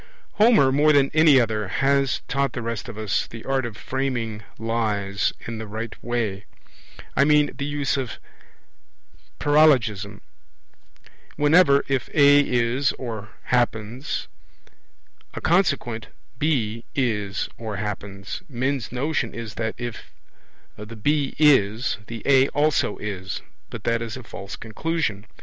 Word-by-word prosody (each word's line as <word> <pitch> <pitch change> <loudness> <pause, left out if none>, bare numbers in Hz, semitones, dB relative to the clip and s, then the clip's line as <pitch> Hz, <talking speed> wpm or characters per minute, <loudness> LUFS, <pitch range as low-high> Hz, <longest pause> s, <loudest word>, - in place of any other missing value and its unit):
Homer 210 - +5
more 150 +3 +4
than 140 -2 +4
any 155 -3 +6
other 110 -3 0
has 135 +6 +1
taught 140 -2 0
the 120 - -4
rest 115 +1 -4
of 110 - -8
us 110 -2 -1
the 115 -1 -10
art 135 -2 0
of 110 -2 -9
framing 125 -5 -3 0.2
lies 105 -3 -1
in 115 -1 -5
the 110 - -6
right 110 +2 -5
way. 110 -5 -2 0.7
I - - +5
mean 150 0 +4
the 140 - -3
use 145 -1 -1
of 130 -4 -4 1.2
paralogism. 130 -10 +3 1.1
Whenever, 145 -1 +5
if 135 -2 -1
A 145 -1 +7
is 125 0 +1
or 110 -5 -6
happens, 120 +1 -1 1.1
a - - -3
consequent, 140 - +1 0.3
B, 115 -7 0
is 105 -7 -1
or 110 -2 -4
happens, 100 - -5
men's 130 -1 -2
notion 130 -1 -1
is 115 -2 -6
that, 110 -1 -3
if 120 -2 -6 0.7
the 105 +2 -9
B 145 +5 0
is, 120 -7 +3
the 115 -2 -7
A 135 -1 +5
also 150 -7 +1
is 95 -3 -5 0.3
but - - -8
that 115 0 0
is 115 0 -5
a 130 - -9
false 100 -3 -8
conclusion. 115 -3 -3
120 Hz, 130 wpm, -23 LUFS, 110-140 Hz, 1.2 s, A